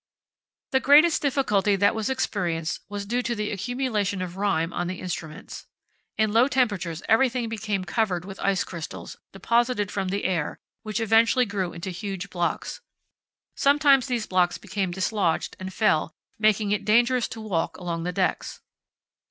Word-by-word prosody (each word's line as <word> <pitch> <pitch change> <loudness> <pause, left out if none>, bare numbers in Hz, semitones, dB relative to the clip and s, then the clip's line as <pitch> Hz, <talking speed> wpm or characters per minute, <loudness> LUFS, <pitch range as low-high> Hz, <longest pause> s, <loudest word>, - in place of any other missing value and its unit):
The 265 - +3
greatest 300 +5 +5
difficulty 215 -8 +2
that 200 +1 +3
was 220 +1 -2
experienced 175 -10 -1
was 205 0 -5
due 240 +4 0
to 240 -1 -2
the 210 -1 -2
accumulation 210 -2 -1
of 180 -1 -7
rime 190 -4 0
on 175 - -2
the 185 0 -5
instruments. 165 -4 -7 0.5
In 215 -1 +2
low 235 +3 +5
temperatures 205 - -1
everything 245 +1 +2
became 210 -4 -3
covered 180 -3 -1
with 195 0 -9
ice 195 -2 +1
crystals, 170 -3 -8
deposited 230 +1 0
from 195 -2 -2
the 200 +2 -2
air, 175 -5 -1 0.2
which 215 0 -3
eventually 225 +3 +4
grew 195 -4 -2
into 185 +3 -6
huge 195 +1 -5
blocks. 175 -1 -2 0.7
Sometimes 280 -2 +4
these 240 -4 -1
blocks 180 -1 +1
became 190 -2 -3
dislodged 190 -1 -1
and 185 0 -6
fell, 165 -7 +1 0.2
making 215 -1 +2
it 210 - 0
dangerous 240 +3 +3
to 225 - -8
walk 190 -7 -2
along 170 -2 -4
the 175 +2 -2
decks. 185 0 -1
205 Hz, 155 wpm, -25 LUFS, 185-230 Hz, 0.7 s, greatest